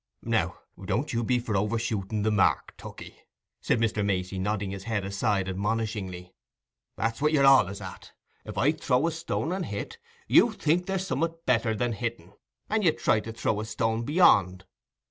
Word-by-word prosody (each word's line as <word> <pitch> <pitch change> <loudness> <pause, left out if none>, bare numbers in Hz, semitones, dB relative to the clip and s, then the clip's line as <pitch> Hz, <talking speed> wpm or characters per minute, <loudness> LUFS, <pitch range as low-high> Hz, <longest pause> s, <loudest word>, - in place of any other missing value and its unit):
"Now, - - 0 0.3
don't 125 +9 -1
you 120 0 0
be 125 +2 +2
for 120 -3 -3
overshooting 105 0 -1
the 110 - +2
mark, 100 -3 +1
Tookey," - - -11 0.4
said - - +1
Mr. 110 -2 0
Macey, 95 -1 -1
nodding 100 0 -1
his 95 -1 -7
head 110 -4 -2
aside 100 -1 0
admonishingly. 100 -2 -3 0.6
"That's 115 +3 -2
what 150 +1 +3
you're 140 -3 +4
allays 130 -8 +5
at; - - -9 0.3
if - - -8
I - - +4
throw 125 +4 +1
a 170 - +1
stone 165 0 -3
and 185 0 -2
hit, 465 - -6 0.3
you 235 - +5
think 175 0 0
there's 190 -1 -1
summat 165 -3 -2
better 115 -3 +2
than 120 +2 -1
hitting, 110 -5 -5 0.3
and 215 0 0
you 165 -4 +4
try 110 - +2
to 115 - -7
throw 110 -1 -1
a 110 - -3
stone 115 0 -1
beyond. 100 - +4
115 Hz, 175 wpm, -27 LUFS, 100-135 Hz, 0.6 s, allays